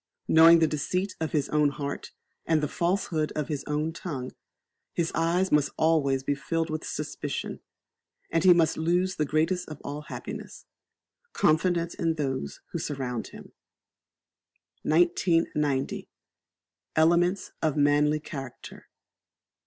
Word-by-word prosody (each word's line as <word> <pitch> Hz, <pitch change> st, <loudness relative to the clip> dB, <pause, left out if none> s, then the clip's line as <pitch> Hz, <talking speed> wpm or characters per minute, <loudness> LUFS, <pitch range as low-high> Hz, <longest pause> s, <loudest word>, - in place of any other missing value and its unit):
Knowing 165 Hz, +1 st, +8 dB
the 165 Hz, -, +4 dB
deceit 180 Hz, +6 st, -1 dB
of 160 Hz, -1 st, -2 dB
his 150 Hz, -3 st, 0 dB
own 150 Hz, -1 st, +3 dB
heart, 140 Hz, 0 st, -5 dB, 0.4 s
and 160 Hz, -2 st, +2 dB
the -, -, +2 dB
falsehood 170 Hz, -2 st, -1 dB
of 150 Hz, 0 st, -2 dB
his 145 Hz, -3 st, -3 dB
own 150 Hz, +2 st, -1 dB
tongue, 140 Hz, -7 st, -5 dB, 0.6 s
his 170 Hz, -1 st, 0 dB
eyes 170 Hz, +3 st, +1 dB
must 150 Hz, -1 st, +3 dB
be -, -, -24 dB
always 140 Hz, -5 st, +2 dB, 0.2 s
filled 165 Hz, -1 st, -1 dB
with 155 Hz, 0 st, -3 dB
suspicion, -, -, -4 dB, 0.7 s
and 165 Hz, 0 st, +1 dB
he 185 Hz, -, +8 dB
must 165 Hz, -2 st, +4 dB
lose 180 Hz, +3 st, +1 dB
the 150 Hz, -, +1 dB
greatest 160 Hz, +5 st, 0 dB
of 155 Hz, -2 st, -8 dB
all 145 Hz, +1 st, -5 dB
happiness -, -, -8 dB, 0.7 s
confidence 170 Hz, +2 st, +2 dB
in 165 Hz, -1 st, 0 dB
those 135 Hz, -, -3 dB
who -, -, -3 dB
surround 130 Hz, -5 st, -3 dB
him. -, -, -12 dB, 1.3 s
1990. 160 Hz, -4 st, +1 dB, 0.9 s
Elements 175 Hz, +4 st, +3 dB
of 155 Hz, -2 st, 0 dB
Manly 145 Hz, +1 st, +3 dB
Character. 135 Hz, -5 st, -9 dB
155 Hz, 130 wpm, -27 LUFS, 150-170 Hz, 1.3 s, Knowing